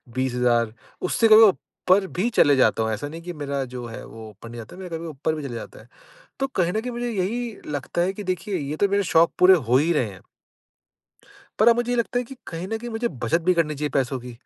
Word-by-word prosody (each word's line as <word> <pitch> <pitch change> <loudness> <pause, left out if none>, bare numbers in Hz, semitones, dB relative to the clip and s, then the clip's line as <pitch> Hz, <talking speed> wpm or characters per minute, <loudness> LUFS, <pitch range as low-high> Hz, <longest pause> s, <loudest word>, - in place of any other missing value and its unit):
20,000 125 -3 +1 0.3
उससे 225 +5 +2
कभी-कभी 220 0 +9
ऊपर 190 +1 0
भी 220 +6 +2
चले 145 - +4
जाता 120 -3 +3
हूँ 110 - -1
ऐसा 110 +7 -3
नहीं 165 +3 -8
की 175 +1 -6
मेरा 140 -2 -3
जो 125 -1 -5
है 115 - -8
वो 110 -1 -10
ऊपर 105 +2 -13
नहीं 120 - -9
जाता 110 - -10
है, 190 - -10
मेरा 180 - -7
कभी-कभी 165 +1 -7
ऊपर 155 +2 -2
भी 150 - -6
चले 125 -4 -5
जाता - - -8
है। - - -19 0.5
तो 270 - +2
कहीं 180 -9 0
न 220 - 0
कहीं 250 +2 -5
मुझे 240 0 -3
यही 225 +3 -2
लगता 145 +3 -3
है 190 +2 0
की 205 - -7
देखिए 185 +2 -2
ये 145 +1 -4
तो 200 - +2
मेरे 200 +1 +2
शौक़ 165 +1 +6
पूरे 185 +1 +8
हो 125 -5 +1
ही 160 +6 +3
रहे 125 -9 0
हैं। 95 - -13 1.4
पर 220 - +7
अब 235 - +5
मुझे 240 0 -1
ये - - +1
लगता 235 +1 0
है 250 - -2
कि 270 - -10
कहीं 165 +2 -5
न 225 - -2
कहीं 240 +2 -7
मुझे 230 +1 -1
बचत 165 +9 +1
भी 185 - +6
करनी 155 -3 +1
चाहिए 150 +1 -2
पैसों 130 -1 0
की। 125 0 -9
165 Hz, 255 wpm, -23 LUFS, 130-210 Hz, 1.4 s, कभी-कभी